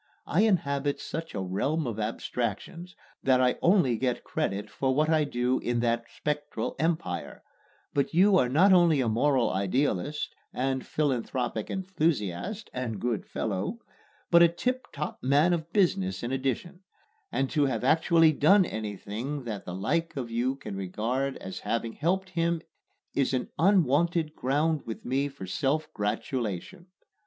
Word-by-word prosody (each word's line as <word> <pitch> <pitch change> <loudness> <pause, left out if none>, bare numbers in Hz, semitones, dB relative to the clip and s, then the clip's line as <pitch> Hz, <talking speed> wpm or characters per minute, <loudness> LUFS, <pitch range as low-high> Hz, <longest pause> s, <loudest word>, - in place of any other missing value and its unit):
I 170 - +2
inhabit 145 -9 +1
such 165 -3 -6
a 100 - -2
realm 140 - -1
of 115 -3 -3
abstractions 120 - -3 0.3
that 130 -1 +3
I 125 -1 +2
only 170 - +4
get 125 -2 -1
credit 100 +2 -2
for 130 +5 -1
what 155 +2 +2
I 155 -2 +3
do 125 -1 0
in 120 -1 -1
that 115 0 0
spectral 150 0 -3
empire; 160 0 -2 0.5
but 140 -1 +1
you 190 +4 +5
are 125 - +2
not 185 +9 +5
only 170 -5 +5
a 125 - +1
moral 125 +3 +2
idealist 125 +7 -1 0.2
and 130 0 -1
philanthropic 125 -5 -1
enthusiast 180 - -2
(and 120 -5 -3
good 120 -2 -2
fellow!), 105 - -2 0.5
but 170 0 +7
a 170 - +9
tip 250 +10 -2
top 150 +1 -5
man 145 +7 +4
of 165 -1 -3
business 95 - +1
in 120 - -2
addition; 135 +7 -2 0.5
and 135 - 0
to 145 -3 +3
have 120 -4 -2
actually 160 +3 +5
done 190 +7 +5
anything 110 - -4
that 110 -4 -5
the 90 - -5
like 160 - -1
of 120 -3 -4
you 125 +3 0
can 120 -7 -7
regard 115 +8 -2
as 95 0 -7
having 115 0 -2
helped 190 +4 -1
him 170 -1 0 0.5
is 135 -1 +1
an 125 - -2
unwonted 170 -3 +3
ground 150 +4 +1
with 115 - -7
me 135 +3 +1
for 140 -8 -8
self 140 +11 -1
gratulation. 115 - -3
135 Hz, 150 wpm, -28 LUFS, 115-165 Hz, 0.5 s, a